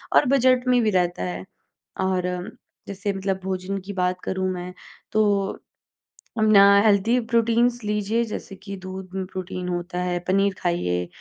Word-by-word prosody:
और -, -, +6 dB
बजट 255 Hz, -1 st, +3 dB
में 250 Hz, -1 st, +4 dB
भी 215 Hz, -, +3 dB
रहता 175 Hz, -, 0 dB
है। 90 Hz, +1 st, -4 dB, 0.6 s
और 185 Hz, -1 st, 0 dB
अम, 180 Hz, +2 st, -3 dB, 0.4 s
जैसे 200 Hz, +1 st, -3 dB
मतलब 195 Hz, 0 st, -2 dB
भोजन 190 Hz, +1 st, -3 dB
की 200 Hz, -, -6 dB
बात 180 Hz, 0 st, -1 dB
करूँ 190 Hz, 0 st, -1 dB
मैं, 180 Hz, 0 st, -6 dB, 0.4 s
तो 205 Hz, -2 st, +1 dB, 0.8 s
अम, 215 Hz, -, +3 dB
ना 200 Hz, -1 st, +8 dB, 0.2 s
हेल्दी 215 Hz, +4 st, +3 dB
प्रोटीन्स 235 Hz, +1 st, +2 dB
लीजिए, 210 Hz, +2 st, 0 dB
जैसे 210 Hz, -2 st, -7 dB
कि 200 Hz, +1 st, -8 dB
दूध 185 Hz, 0 st, -8 dB
में 190 Hz, -, -2 dB
प्रोटीन 185 Hz, -1 st, -6 dB
होता 175 Hz, 0 st, -3 dB
है, 180 Hz, -1 st, -1 dB
पनीर 195 Hz, +1 st, +2 dB
खाइए। 90 Hz, -, -1 dB
190 Hz, 160 wpm, -24 LUFS, 180-210 Hz, 0.8 s, ना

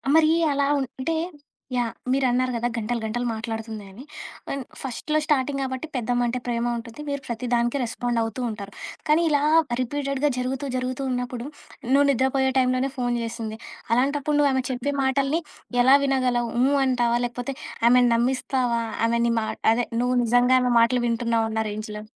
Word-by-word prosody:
మరి 320 Hz, -1 st, +6 dB, 0.2 s
అలా 280 Hz, 0 st, +1 dB
ఉంటే 265 Hz, +4 st, -3 dB, 0.6 s
యాహ్! 240 Hz, -2 st, 0 dB, 0.2 s
మీరన్నారు 255 Hz, -1 st, +2 dB
కదా 235 Hz, +1 st, 0 dB
గంటలు, 235 Hz, +1 st, -2 dB
గంటలు 240 Hz, +3 st, -2 dB
మాట్లాడుతుంది 225 Hz, -1 st, -5 dB
అని. 220 Hz, +7 st, -11 dB, 0.5 s
అండ్ 275 Hz, -1 st, -3 dB, 0.2 s
ఫస్ట్‌లో 275 Hz, +4 st, -2 dB
స్టార్టింగ్ 280 Hz, -2 st, +1 dB
గాబట్టి, 260 Hz, +3 st, -4 dB
పెద్దమ్మంటే 245 Hz, 0 st, 0 dB
ప్రేమ 235 Hz, -1 st, -1 dB
ఉంటుంది. 230 Hz, +4 st, -9 dB
మీరు 280 Hz, -1 st, -2 dB
ప్రతి 235 Hz, +1 st, -4 dB
దానికి 240 Hz, +3 st, +1 dB
రెస్పాండవుతూ 235 Hz, 0 st, -2 dB
ఉంటారు. 205 Hz, -2 st, -7 dB, 0.4 s
కానీ, 305 Hz, +2 st, +4 dB
ఇలా 290 Hz, -2 st, +2 dB, 0.4 s
రిపీటెడ్‌గా 275 Hz, +2 st, -1 dB
జరుగుతూ, 260 Hz, +2 st, -2 dB
జరుగుతూ 255 Hz, +1 st, -3 dB
ఉన్నప్పుడు 245 Hz, -1 st, -3 dB, 0.5 s
నువ్వు 280 Hz, +1 st, +5 dB
నిద్రపోయే 265 Hz, +1 st, +2 dB
టైంలోనే 255 Hz, +1 st, +2 dB
ఫోను 245 Hz, -1 st, 0 dB
చేసింది. 225 Hz, -1 st, -5 dB, 0.4 s
అలాంటప్పుడు 285 Hz, +4 st, +1 dB
నువ్వు 285 Hz, -1 st, +4 dB
ఆమె 260 Hz, -1 st, +1 dB
చెప్పే 255 Hz, +3 st, -2 dB
మాటల్ని 275 Hz, +4 st, +1 dB, 0.4 s
ఎలా 260 Hz, +3 st, +7 dB
వినగలవు? 250 Hz, -3 st, +1 dB
హ్మ్, 275 Hz, +3 st, +3 dB
అంటావా? 240 Hz, -2 st, +2 dB
లేకపోతే 245 Hz, +2 st, -4 dB, 0.4 s
ఆమెని 250 Hz, 0 st, +5 dB
నమ్మిస్తావా? 245 Hz, 0 st, 0 dB, 0.3 s
ఆమె 235 Hz, 0 st, +1 dB
నీ 235 Hz, -, +2 dB
మా 220 Hz, -, -2 dB, 0.3 s
అదే 245 Hz, +1 st, 0 dB, 0.2 s
నువ్వు 250 Hz, +1 st, +1 dB
నిజంగా 245 Hz, +2 st, +4 dB
ఆమె 250 Hz, -, +1 dB
మాటలు 240 Hz, +2 st, +3 dB
వింటున్నావున్నా 230 Hz, -1 st, 0 dB
రేంజ్‌లో? 210 Hz, 0 st, -6 dB
250 Hz, 150 wpm, -24 LUFS, 235-270 Hz, 0.6 s, ఎలా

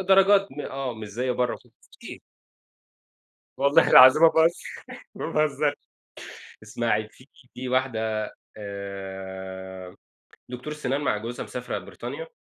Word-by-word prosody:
درجات 195 Hz, +1 st, +6 dB
م 150 Hz, -, -8 dB
آه 135 Hz, -3 st, -4 dB
مش 110 Hz, -1 st, -8 dB
زي 125 Hz, +5 st, -2 dB
برّا 125 Hz, 0 st, -1 dB
في -, -, -24 dB, 1.9 s
والله 140 Hz, +1 st, +4 dB
العظيم 130 Hz, +5 st, +9 dB
ما 165 Hz, -, +10 dB
باهزر 160 Hz, +2 st, +3 dB, 0.6 s
ما -, -, -5 dB
باهزرش 150 Hz, -1 st, +1 dB, 0.9 s
اسمعي 110 Hz, 0 st, -1 dB
في 130 Hz, -, -20 dB, 0.3 s
في 125 Hz, 0 st, -6 dB
واحدة 110 Hz, -5 st, -1 dB, 0.3 s
آآ 95 Hz, -2 st, -8 dB, 0.5 s
دكتورة 125 Hz, +5 st, -6 dB
سنان 145 Hz, -2 st, -2 dB
مع 105 Hz, -, 0 dB
جوزها 115 Hz, +3 st, -5 dB
مسافرة 125 Hz, 0 st, -5 dB
بريطانيا -, -, -8 dB
125 Hz, 115 wpm, -25 LUFS, 105-145 Hz, 1.9 s, ما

